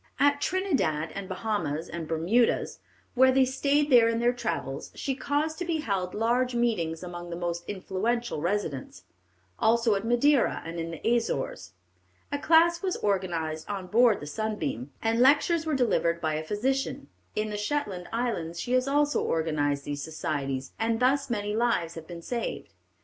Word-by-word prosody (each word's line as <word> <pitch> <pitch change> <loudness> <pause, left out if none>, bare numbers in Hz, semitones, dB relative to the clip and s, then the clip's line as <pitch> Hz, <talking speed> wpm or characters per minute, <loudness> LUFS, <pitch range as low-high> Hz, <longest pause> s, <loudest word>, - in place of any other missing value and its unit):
At 285 +1 +3
Trindad, 270 - 0
and 195 -1 -6
Bahamas, 185 -6 -2
and 170 -2 -6
Bermudas, 175 +10 +1 0.3
when 260 0 +5
they 265 -1 +5
stayed 285 +3 +1
there 235 -2 +7
in 230 - 0
their 240 +1 +3
travels, 165 - -4
she 275 - -2
caused 295 +4 -1
to - - -1
be 330 -2 -1
held 190 -7 -2
large 240 +3 +1
meetings 180 -9 0
among 175 -1 -7
the 170 - -4
most 170 0 -3
influential 205 +1 -2
residents; 160 - -3 0.6
also 230 0 +3
at 195 0 -1
Madeira 240 +4 +3
and 165 +1 -5
in 165 0 -3
the 165 +5 -5
Azores. 135 - -2 0.6
A 285 - -1
class 335 +2 +4
was 380 -2 -1
organized 170 -6 -1
on 195 -2 -3
board 230 +2 +4
the - - -6
Sunbeam, 180 - -3
and 225 +1 +1
lectures 305 +5 +4
were 310 - +1
delivered 170 -10 +1
by 155 -2 -1
a 155 +1 -2
physician. 255 +10 -1 0.3
In 215 0 -1
the - - -3
Shetland 210 -6 -2
Islands 220 -9 -2
she 245 - -4
has 255 +1 +2
also 290 +1 +2
organized 145 -3 0
these 145 -1 -4
societies, 135 -4 -3
and 225 0 +1
thus 275 +2 +2
many 210 -2 -1
lives 220 -8 +1
have 165 -1 -9
been 170 -1 -8
saved. 235 +3 -4
215 Hz, 165 wpm, -28 LUFS, 165-255 Hz, 0.6 s, there